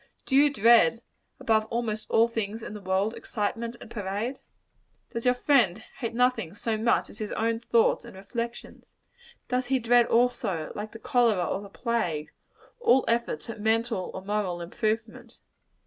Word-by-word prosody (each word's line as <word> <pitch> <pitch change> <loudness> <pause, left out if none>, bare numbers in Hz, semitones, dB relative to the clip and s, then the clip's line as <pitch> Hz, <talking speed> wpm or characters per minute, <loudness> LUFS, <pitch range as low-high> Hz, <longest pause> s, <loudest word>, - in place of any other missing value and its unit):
Do 265 - 0
you 290 +1 +6
dread, 235 -1 +5 0.4
above 220 -1 +2
almost 220 -2 -3
all 230 +1 +4
things 225 -1 -4
in - - -6
the 210 - -8
world, 190 +3 0
excitement 230 +2 -3
and 230 - -12
parade? 210 +5 -3 0.7
Does 230 +1 -4
your 250 0 +4
friend 245 -9 +3 0.2
hate 230 -2 -3
nothing 235 -8 +1
so 225 +1 -1
much 225 +2 +1
as 215 - -4
his 215 -1 -4
own 225 0 0
thoughts 235 0 +2
and 235 -4 -12
reflections? 235 +5 -6 0.6
Does 250 0 -1
he 265 +1 +2
dread, 240 0 +4
also, 230 -9 +1
like 210 +1 -6
the - - -7
cholera 225 -6 +2
or 190 - -2
the 200 - -10
plague, 195 -10 -2 0.5
all 265 - +4
efforts 235 -9 -1
at 225 -2 -7
mental 225 -2 0
or 185 - -6
moral 200 -4 -1
improvement? 225 +6 -3
225 Hz, 165 wpm, -27 LUFS, 205-240 Hz, 0.7 s, you